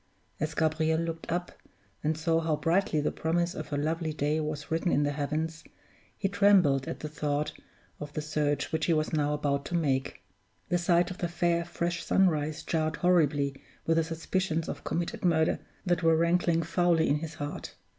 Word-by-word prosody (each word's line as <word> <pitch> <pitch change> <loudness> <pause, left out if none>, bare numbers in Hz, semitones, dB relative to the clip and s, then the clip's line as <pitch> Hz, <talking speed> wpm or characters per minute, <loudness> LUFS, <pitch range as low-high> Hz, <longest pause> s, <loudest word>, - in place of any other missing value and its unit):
As 155 0 -2
Gabriel 160 0 +1
looked 165 0 -4
up, 175 +1 -2 0.5
and 155 +1 0
saw 165 +1 +2
how 160 -1 +1
brightly 165 -1 +1
the 145 - 0
promise 170 +2 0
of 155 - -7
a 145 - 0
lovely 160 +2 -1
day 150 +1 0
was 150 -1 -4
written 165 +2 +1
in 145 - +3
the 145 - +1
heavens, 155 +3 -2 0.5
he 195 - 0
trembled 195 -9 +4
as - - -3
he - - -2
thought 150 -1 -2 0.5
of 150 0 -6
the 155 - -2
search 150 -2 -1
which 160 -1 0
he 170 - +4
was 155 0 0
now 150 -1 +1
about 145 -1 0
to 175 - -3
make. 135 -5 -1 0.5
The 175 - +2
sight 175 +1 +2
of 180 - -8
the 175 - 0
fair, 170 0 +1
fresh 170 0 -3
sunrise 155 -4 +1
jarred 155 -1 0
horribly 145 -6 +2 0.2
with 165 0 +2
the 165 - +4
suspicions 165 +1 -2
of - - -5
committed 170 0 -3
murder 160 -3 +2 0.3
that 175 -2 +1
were 165 -1 +4
rankling 170 0 +2
foully 170 -1 +2
in 145 - +3
his 155 0 -6
heart. 145 -1 -6
160 Hz, 185 wpm, -29 LUFS, 150-170 Hz, 0.5 s, trembled